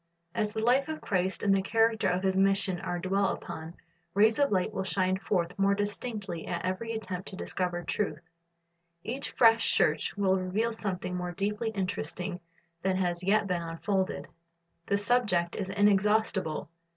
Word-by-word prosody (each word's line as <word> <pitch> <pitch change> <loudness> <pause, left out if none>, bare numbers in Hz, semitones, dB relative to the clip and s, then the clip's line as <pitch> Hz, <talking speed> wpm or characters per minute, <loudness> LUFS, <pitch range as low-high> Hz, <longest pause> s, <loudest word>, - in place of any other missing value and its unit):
As 210 -2 0
the 220 - -2
life 255 +5 +3
of 315 0 -4
Christ 190 -1 -1
and 200 -1 +4
the 195 - +3
character 225 +2 +2
of 180 +1 0
His 190 -1 +2
mission 195 -1 +2
are 175 - -3
dwelt 190 +2 +1
upon, 160 +2 -8 0.4
rays 220 +5 +4
of 285 -1 +3
light 190 +2 +1
will 190 - -2
shine 185 0 +1
forth 175 -4 0
more 200 0 +4
distinctly 205 -3 -3
at 170 - -3
every 205 +5 -2
attempt 190 -5 -5
to 190 - -6
discover 180 -2 -2
truth. 200 +4 -1 0.9
Each 265 +4 -3
fresh 225 -1 +4
search - - +1
will 190 -1 +3
reveal 200 +6 0
something 190 -5 -3
more 180 0 -3
deeply 210 +4 -1
interesting 180 -2 -3 0.4
than 190 0 +1
has 175 -1 0
yet 210 +3 +3
been 180 -3 -1
unfolded. 185 +4 -2 0.6
The 200 - +2
subject 205 -6 +1
is 190 -2 -3
inexhaustible. 205 -4 +2
195 Hz, 165 wpm, -29 LUFS, 180-215 Hz, 0.9 s, and